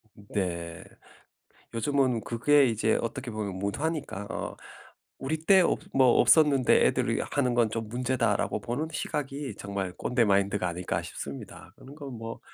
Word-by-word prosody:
네. 85 -5 -4 0.9
요즘은 130 0 +1
그게 140 +6 +3
이제 110 -2 +1
어떻게 115 +2 -4
보면 105 -4 -4
문화니까 135 - -3
어 - - -4 0.6
'우리 145 +4 -2
때 190 +1 +6
없 - - +1 0.2
뭐 130 -3 +5
없었는데 145 -5 +5
애들이 - - +1
하는 130 -4 +1
건 115 -3 +3
좀 110 -1 -4
문제다.'라고 125 0 0
보는 140 +7 -3
시각이 145 -2 -4
정말 100 -2 -4
꼰대 125 -2 +1
마인드가 100 -2 +1
아닐까 85 -1 -3
싶습니다. 70 -4 -8
그런 135 - -13
건 135 -5 -8
뭐 115 0 -7
115 Hz, 300 characters per minute, -28 LUFS, 100-135 Hz, 0.9 s, 때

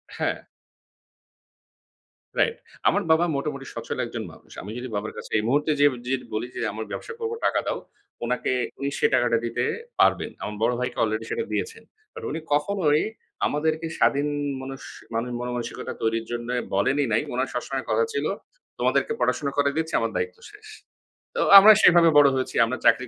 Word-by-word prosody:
হ্যা। - - -2 1.9
রাইট, 465 - +3 0.3
আমার - - +3
বাবা 160 +2 +5
মোটামুটি 140 -1 -3
সচ্ছল - - -5
একজন - - -5
মানুষ। - - -19
আমি 105 - -8
যদি 125 +1 -5
বাবার 105 +1 -3
কাছে - - -8
এই 105 - 0
মুহূর্তে 145 +5 +2
যেইয়ে 145 0 +5
ডিরেক্ট 130 +1 -2
বলি 110 +3 -2
যে - - -4
আমার 110 +1 -5
ব্যবসা 470 - -6
করবো 460 0 -2
টাকা - - +2
দাও। - - -1 0.5
উনাকে 125 +2 -1 0.3
উনি 140 0 -1
সেই - - +4
টাকাটা 120 -1 +3
দিতে 120 +1 -1 0.4
পারবেন। - - +3
আমার 105 - -4
বড় 120 +2 +3
ভাইকে 125 - -3
আলরেডি 110 +1 -1
সেটা 455 - -1
দিয়েছেন। 455 0 -3 0.3
বাট 455 -1 -9
উনি - - -3
কখনোই 150 -1 +2 0.5
আমাদেরকে 160 +2 -1
স্বাধীন 145 +1 +3 0.3
মানুষ 135 0 -7 0.3
মানে, 115 +2 -1
মনো 125 0 -3
মানসিকতা 120 -1 -5
তৈরির 115 0 0
জন্য 120 0 -4 0.3
বলেনই 135 +8 +2
নাই। 110 - +3
উনার 130 +2 -1
সবসময় 130 +2 -3
কথা 465 - +2
ছিল 430 - -1 0.5
তোমাদেরকে 455 - +1
পড়াশোনা 140 - 0
করাই 140 0 +2
দিচ্ছি 160 0 -2
আমার - - -1
দায়িত্ব 460 0 -2
শেষ। 420 +1 -15 0.7
তো - - 0 0.2
আমরা 215 +2 +9
সেভাবে 170 -1 +7
বড় 145 -1 +8
হয়েছি, 130 -1 -2
আমরা 130 +3 -3
চাকরি 125 - +4
140 Hz, 170 wpm, -25 LUFS, 120-160 Hz, 1.9 s, আমরা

